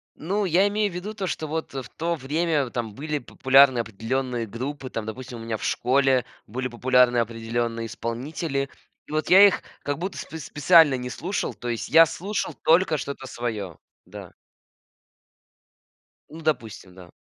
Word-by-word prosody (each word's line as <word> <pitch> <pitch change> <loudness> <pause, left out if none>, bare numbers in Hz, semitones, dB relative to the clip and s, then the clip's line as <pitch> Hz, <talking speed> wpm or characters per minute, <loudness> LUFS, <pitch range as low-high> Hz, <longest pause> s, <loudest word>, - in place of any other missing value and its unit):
Ну, 200 +5 -1
я 185 +3 +4
имею 205 -1 0
в - - -10
виду 205 +4 -5
то, 200 -3 -3
что 160 -3 -3
вот 160 -1 -4
в 130 -3 -6
то 170 +1 0
время 150 -1 0
там 115 -3 -4
были 150 +5 -3
популярны 130 0 +4
определённые 115 +2 -2
группы, 130 +5 -6
там, 110 -1 -4
допустим, 125 +1 -7
у - - -9
меня 115 -1 -3
в - - -10
школе 130 -1 +2 0.2
были 130 +4 -4
популярны 125 0 +3
определённые 115 0 -2
исполнители, 135 +5 -3 0.4
и - - -12
вот 155 0 -1
я 195 +2 +9
их 195 - -1 0.2
как 145 -1 -2
будто 185 +4 -4
спец 160 -1 -7
специально 150 -1 +5
не 125 0 -5
слушал, 180 +10 -3
то 120 - -8
есть 115 -1 -3
я 165 0 +8
слушал 195 +6 -3
только 165 -1 +4
что-то 140 -1 -6
своё, 110 -8 -5 0.3
да. - - -11 2.0
Ну, 160 +1 -10
допустим, 110 -11 -3
да. 90 -2 -13
135 Hz, 165 wpm, -24 LUFS, 120-160 Hz, 2.0 s, я